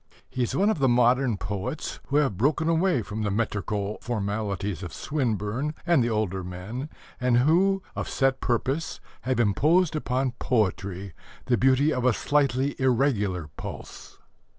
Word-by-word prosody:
He 130 - -3
is 120 - 0
one 205 +3 +3
of 185 - -2
the 135 -2 +3
modern 120 -1 +3
poets 100 +9 -4
who 140 - -2
have 145 -8 +3
broken 150 - +1
away 165 - +2
from 105 +2 -5
the 105 - 0
metrical 105 -1 -2
formalities 100 -4 -2
of 90 -4 -7
Swinburne 125 +1 -2
and 170 -7 +4
the 120 - 0
older 105 -4 -1
men, 95 - -6 0.3
and 125 -2 +3
who, 185 +9 +3
of - - -3
set 135 -1 +1
purpose, 135 +6 -1 0.2
have 130 -1 -1
imposed 155 - +3
upon 130 -3 0
poetry 100 -5 -1 0.3
the 125 - +3
beauty 135 +5 +3
of 125 - -1
a 125 -1 +4
slightly 140 +1 +1
irregular 110 - +1
pulse. - - -8
125 Hz, 150 wpm, -26 LUFS, 105-140 Hz, 0.3 s, and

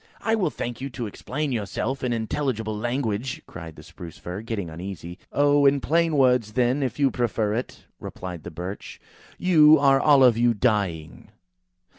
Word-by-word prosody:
"I 225 - 0
will 200 -7 +1
thank 120 -3 -6
you 135 - -4
to 120 -2 -5
explain 140 +7 -4
yourself 125 +4 -3
in 125 - 0
intelligible 110 -1 -2
language," 120 +1 -3
cried 80 -1 -10
the - - -13
Spruce 85 -2 -11
fir, 90 +4 -6
getting 110 -5 -4
uneasy. 85 +2 -8
"Oh! 145 0 +4
in 140 0 +3
plain 165 +2 +1
words, 125 -5 +3
then, 125 +4 +1
if 130 -3 -2
you 140 -2 +2
prefer 110 -3 -1
it," 120 +3 -5
replied 90 -3 -7
the - - -8
Birch. 90 +4 -7 0.4
"You 155 -4 +6
are 135 -1 +4
all 145 -3 +5
of 120 -3 +5
you 120 -1 +3
dying." 100 -9 -1
120 Hz, 170 wpm, -24 LUFS, 100-140 Hz, 0.4 s, You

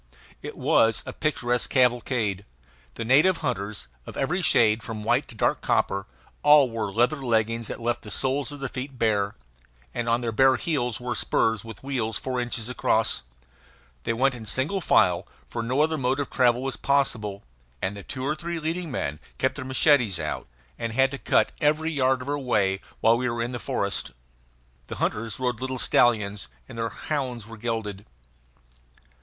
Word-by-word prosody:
It - - -7
was 115 -3 +3
a - - -6
picturesque 125 -5 0
cavalcade. 120 -5 +1 0.5
The - - -4
native 150 +9 +5
hunters, 100 - -3 0.2
of - - -8
every 175 +8 0
shade 110 -8 +4
from 110 -2 -6
white 120 +6 +2
to 120 - -13
dark - - +1
copper, 95 0 0 0.3
all 145 -4 +6
wore 110 -3 -2
leather 120 +8 +1
leggings 115 -2 0
that - - -6
left 120 0 -1
the 105 - -10
soles 135 +4 0
of 145 -1 -9
their 135 - -1
feet 130 0 -6
bare, 105 -3 +1 0.6
and 115 -1 -2
on 115 +1 +2
their 115 -1 -1
bare 130 +4 +5
heels 125 -9 -1
wore 125 -1 -3
spurs 110 -1 +1
with 115 -1 -10
wheels 120 -5 -2
four 130 -1 -2
inches 120 -2 -3
across. 115 -3 +1 0.8
They - - -1
went 130 +3 +2
in 115 -3 -8
single 150 - 0
file, 90 - +3 0.2
for 120 - -4
no 125 +5 +1
other 160 0 +1
mode 130 +2 +1
of 145 - -3
travel 125 -1 +3
was 135 -1 -2
possible; 110 -8 0 0.4
and 95 +7 -2
the 100 - -7
two 130 +6 -5
or 150 - +1
three 170 +2 -4
leading 165 +2 -3
men 75 - -3 0.2
kept - - +1
their - - -6
machetes 130 - +3
out, 75 -1 -4 0.3
and 115 -1 -3
had 135 +2 +3
to 140 - -6
cut - - +2
every 155 +2 +2
yard 130 -3 +1
of - - -12
our 145 0 0
way 100 -7 +1 0.2
while 115 +1 +5
we 125 +1 0
were 115 0 -1
in 120 - -3
the 120 - -4
forest. - - -2 0.8
The - - -6
hunters 115 +1 -2
rode 125 -2 -1
little 130 0 -2
stallions, 105 -5 +2 0.2
and - - -10
their 115 0 -2
hounds 125 -3 -3
were 115 +1 -10
gelded. 110 -3 -4
120 Hz, 185 wpm, -26 LUFS, 110-135 Hz, 0.8 s, all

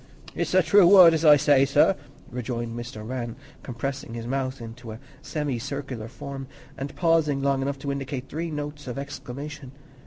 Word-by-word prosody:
"It's - - -2
a 185 - +6
true 180 +3 +6
word 180 -3 +9
as 160 0 0
I 150 -2 +8
say, 140 -1 +4
sir," 145 +7 +4 0.4
rejoined 120 -1 -4
Mr. 120 -2 -7
Rann, 120 -2 -4 0.3
compressing 130 -1 -5
his 115 -1 -5
mouth 130 +1 -2
into 115 0 -9
a 110 - -10 0.2
semicircular 140 -4 -4
form 135 +3 -7 0.3
and 140 +1 -6
pausing 160 -5 +2
long 140 -1 +1
enough 140 +1 -2
to 140 +1 -4
indicate 135 -1 -4
three 165 +4 -4
notes 150 -1 -6
of 125 - -5
exclamation. 140 0 -7
135 Hz, 165 wpm, -25 LUFS, 125-150 Hz, 0.4 s, word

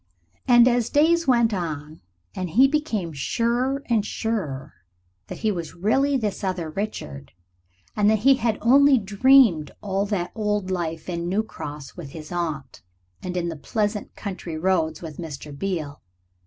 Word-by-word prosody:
And 240 -2 +7
days 290 +7 +3
went 235 -3 +3
on, 155 -4 -5 0.3
and 185 -1 -4
he 255 +11 +5
became 235 - -2
surer 240 - 0
and 225 -4 +1
surer 190 -13 -3 0.5
that - - -7
he 220 - 0
was 170 -5 -5
really 270 +10 +2
this 215 -4 -3
other 180 -4 -2
Richard, 75 - -5 0.6
and 210 0 +3
that 220 - +4
he 270 -1 +7
had 230 -2 0
only 275 +4 +6
dreamed 210 - +4
all 200 0 -1
that 185 -4 -2
old 210 -3 -1
life 165 -3 -3
in 170 -1 -3
New 205 +4 +1
Cross 150 -9 -8
with 150 -6 -8
his 155 0 -9
aunt 160 - -4 0.4
and 180 0 -4
in 170 -1 -1
the 165 - -5
pleasant 210 +6 -2
country 185 -5 -6
roads 160 -2 0
with 160 -2 -8
Mr. 150 -3 -7
Beale. 155 -4 -4
195 Hz, 155 wpm, -24 LUFS, 160-230 Hz, 0.6 s, And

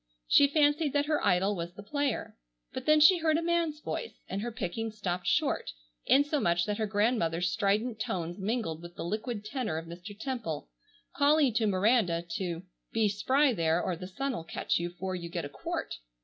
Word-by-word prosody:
She 285 - +6
fancied 295 0 +2
that 285 0 +2
her 300 0 0
idol 195 +1 +3
was 170 0 -5
the 205 - -9
player. 285 +2 -2 0.4
But - - -6
then 305 0 +6
she 345 +4 +7
heard 315 -1 +2
a - - 0
man's 335 -3 0
voice, 460 - -5
and 195 - -3
her 240 +2 -3
picking 225 +1 -3
stopped 185 -5 -3
short - - +1 0.3
insomuch 275 - +3
that 210 0 -2
her 215 - 0
grandmother's 200 -5 +1
strident 215 +3 0
tones 175 -3 -3
mingled 195 -6 -2
with 175 0 -10
the - - -5
liquid 215 +3 -3
tenor 230 - -2
of 165 - -5
Mr. 180 +5 -10
Temple, 220 - -4 0.5
calling 285 -3 +4
to 220 0 +2
Miranda 190 -3 +2
to 175 -2 -3 0.3
"be 220 -2 +2
spry 260 +7 +2
there 165 -3 +2
or 180 0 -1
the 180 +2 -7
sun'll 260 +3 -3
catch - - -1
you 170 0 -2
'fore 185 +2 -5
you 170 -2 -5
get 170 -2 -3
a - - -6
quart." - - -4
210 Hz, 190 wpm, -30 LUFS, 175-270 Hz, 0.5 s, she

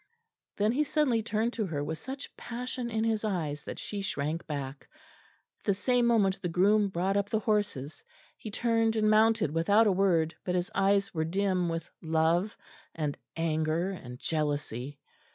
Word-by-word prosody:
Then 210 +2 +3
he 285 +5 +2
suddenly 280 -6 +2
turned 220 +2 -1
to 215 -4 -1
her 145 -4 -2
with 160 +2 -4
such 265 +3 -7
passion 245 0 -5
in 220 -1 0
his 225 -1 0
eyes 160 -8 -2
that - - -6
she 205 -1 -4
shrank 155 -3 -2
back. 140 -2 -5 0.7
At - - -29
the 200 - +3
same 245 +3 +2
moment 195 -5 +3
the 175 - -2
groom 200 +5 +4
brought 190 +2 0
up 200 0 +1
the 220 - +1
horses; 195 - -1 0.3
he 220 - -8
turned 225 +1 +1
and 215 -1 +3
mounted 220 -6 +4
without 200 +8 +4
a 210 - +4
word, 175 -4 +2
but 180 - -1
his 180 0 -1
eyes 200 +1 +2
were 160 -2 0
dim 185 +1 0
with 165 0 -3
love 165 +5 +1 0.4
and 150 -3 -2 0.2
anger 165 +2 0
and 125 -10 -8
jealousy. 145 -3 -2
195 Hz, 170 wpm, -29 LUFS, 160-220 Hz, 0.7 s, groom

